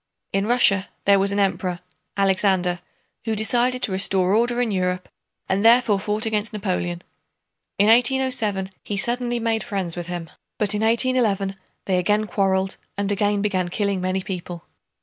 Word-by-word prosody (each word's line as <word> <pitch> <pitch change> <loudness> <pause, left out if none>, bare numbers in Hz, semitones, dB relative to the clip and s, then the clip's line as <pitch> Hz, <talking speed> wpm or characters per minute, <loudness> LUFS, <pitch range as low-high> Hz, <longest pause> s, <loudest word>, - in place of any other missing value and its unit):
In 195 +1 0
Russia 205 -5 +3 0.2
there 200 0 +5
was 195 +1 +2
an 200 - -1
Emperor, 185 -2 -1 0.4
Alexander, 190 -2 +1 0.5
who 225 -1 -1
decided 245 +4 +1
to - - +2
restore 190 0 +2
order 240 +2 +1
in 240 -3 0
Europe 180 -1 -1 0.4
and 195 +2 0
therefore 230 -3 +5
fought 210 +2 0
against 215 -1 -1
Napoleon. 180 -4 -3 0.7
In 200 - +4
1807 230 -4 +2
he 205 - -4
suddenly 240 +3 0
made 225 -1 -1
friends 190 -5 -3
with 175 -1 -6
him, 175 -3 -6 0.3
but 210 -1 0
in 210 - -2
1811 225 -4 +1 0.3
they 185 -2 +1
again 210 +4 +1
quarreled 190 -2 0 0.2
and 200 0 -1
again 205 0 0
began 185 -4 0
killing 200 0 -1
many 185 +1 -1
people. 175 -3 -6
200 Hz, 155 wpm, -22 LUFS, 190-220 Hz, 0.7 s, there